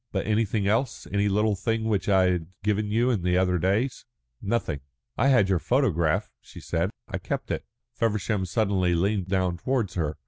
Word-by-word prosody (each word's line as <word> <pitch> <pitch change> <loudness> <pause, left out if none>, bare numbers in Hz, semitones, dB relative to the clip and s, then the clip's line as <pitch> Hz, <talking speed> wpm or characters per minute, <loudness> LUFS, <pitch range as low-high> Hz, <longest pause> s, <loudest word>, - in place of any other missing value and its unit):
"But - - -2
anything 105 -1 +1
else? 115 +4 0
Any 100 0 +2
little 105 +1 +2
thing 115 +3 -1
which 105 -2 0
I 95 -2 +4
had 85 -3 -2 0.2
given 105 0 0
you 120 +4 +2
in 110 -7 0
the 90 +1 +1
other 90 -1 +2
days?" 105 +9 0 0.4
"Nothing." 100 -9 -1 0.3
"I 130 - +2
had 125 -8 +5
your 95 -2 +2
photograph," 85 - +1
she - - -12
said. - - -1 0.2
"I - - -4
kept - - -4
it." - - -3 0.3
Feversham 105 -3 0
suddenly 95 -3 +1
leaned 95 +2 0
down 95 -2 0
towards 120 -3 -1
her. 80 -3 -2
100 Hz, 180 wpm, -26 LUFS, 90-110 Hz, 0.4 s, had